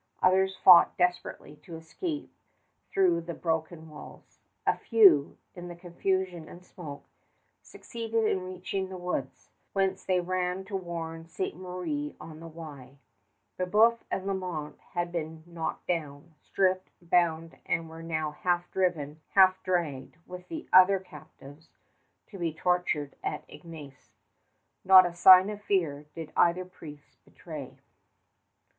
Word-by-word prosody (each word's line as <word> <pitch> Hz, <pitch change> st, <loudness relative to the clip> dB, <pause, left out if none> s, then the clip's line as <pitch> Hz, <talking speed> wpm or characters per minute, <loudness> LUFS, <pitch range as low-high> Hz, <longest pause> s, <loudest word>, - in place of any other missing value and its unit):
Others 190 Hz, +1 st, +3 dB
fought 180 Hz, -2 st, +7 dB
desperately 180 Hz, -4 st, -2 dB
to 155 Hz, +3 st, -11 dB
escape 295 Hz, -, -6 dB, 0.6 s
through 175 Hz, -3 st, +3 dB
the 170 Hz, 0 st, -7 dB
broken 160 Hz, 0 st, -3 dB
walls. 155 Hz, -1 st, -13 dB, 0.3 s
A -, -, +3 dB
few, 190 Hz, -, +4 dB, 0.2 s
in 175 Hz, -1 st, -9 dB
the 175 Hz, -, -8 dB
confusion 175 Hz, -1 st, -3 dB
and 180 Hz, +1 st, -13 dB
smoke, 155 Hz, -6 st, -10 dB, 0.6 s
succeeded 225 Hz, -1 st, -3 dB
in 190 Hz, -, +1 dB
reaching 185 Hz, +1 st, -4 dB
the 190 Hz, -, -7 dB
woods, 175 Hz, -7 st, -5 dB, 0.2 s
whence 195 Hz, -1 st, 0 dB
they 185 Hz, -1 st, +1 dB
ran 180 Hz, +1 st, -2 dB
to 195 Hz, +1 st, -6 dB
warn 165 Hz, -3 st, -5 dB
Ste. 180 Hz, +3 st, -4 dB
Marie 185 Hz, -, -5 dB
on 155 Hz, -1 st, -10 dB
the 165 Hz, -, -9 dB
Wye. 145 Hz, -5 st, -11 dB, 0.6 s
Brébeuf 215 Hz, +6 st, +4 dB
and 190 Hz, -, -3 dB
Lalemant 180 Hz, -6 st, -4 dB, 0.2 s
had 175 Hz, 0 st, -1 dB
been 160 Hz, -2 st, -5 dB
knocked 170 Hz, -2 st, -5 dB
down, 160 Hz, -2 st, -4 dB
stripped, 185 Hz, -1 st, 0 dB
bound, 165 Hz, -2 st, 0 dB
and 165 Hz, 0 st, -1 dB
were 160 Hz, 0 st, -10 dB
now 155 Hz, -2 st, -2 dB
half 175 Hz, +3 st, -1 dB
driven, 155 Hz, -5 st, -1 dB
half 190 Hz, -1 st, +6 dB
dragged, 165 Hz, -8 st, -2 dB
with 180 Hz, 0 st, -10 dB
the 320 Hz, -1 st, -7 dB
other 185 Hz, +1 st, +7 dB
captives 155 Hz, -3 st, -14 dB, 0.6 s
to 195 Hz, -, -12 dB
be 170 Hz, -2 st, -1 dB
tortured 160 Hz, -4 st, -1 dB
at -, -, -4 dB
Ignace. 150 Hz, -4 st, -13 dB, 0.7 s
Not 185 Hz, -1 st, +8 dB
a 175 Hz, -, -3 dB
sign 185 Hz, +3 st, +8 dB
of 210 Hz, 0 st, -8 dB
fear 155 Hz, -8 st, -1 dB
did 160 Hz, -2 st, -8 dB
either 175 Hz, +1 st, +3 dB
priest 150 Hz, -5 st, -14 dB
betray. -, -, -10 dB
175 Hz, 135 wpm, -28 LUFS, 160-185 Hz, 0.7 s, Not